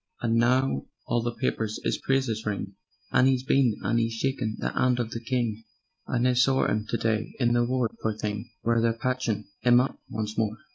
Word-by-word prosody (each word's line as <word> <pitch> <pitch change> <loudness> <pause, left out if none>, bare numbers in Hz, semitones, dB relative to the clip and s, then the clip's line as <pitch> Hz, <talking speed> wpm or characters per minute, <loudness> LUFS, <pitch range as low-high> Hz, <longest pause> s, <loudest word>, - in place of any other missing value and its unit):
And 115 -1 +1
now 125 - +2 0.2
all 120 - +1
the 120 0 -3
papers 110 -4 -1
'is - - 0
praises 130 -5 0
ring, 100 -2 -3 0.4
And 130 - +5
'e's 130 -1 +1
been 130 -4 +3
and 115 - +2
'e's 115 0 0
shaken 115 -2 -1
the - - -2
'and 125 -1 +2
of 115 -2 -2
the 115 - -4
King 115 -2 -2 0.4
And 125 +1 +1
I 125 - +3
sawr 130 +2 +3
'im 105 0 -1
to - - -1
day 110 -1 -1
in 120 -2 +3
the 120 0 +3
ward, 125 -2 0
pore 110 -1 -1
thing, 105 +1 -4
Where 115 0 +2
they're 115 0 +2
patchin' 115 -3 -1 0.2
'im 120 0 +6
up 130 - -1
once 110 -1 -3
more. 110 0 0
115 Hz, 205 wpm, -27 LUFS, 110-125 Hz, 0.4 s, im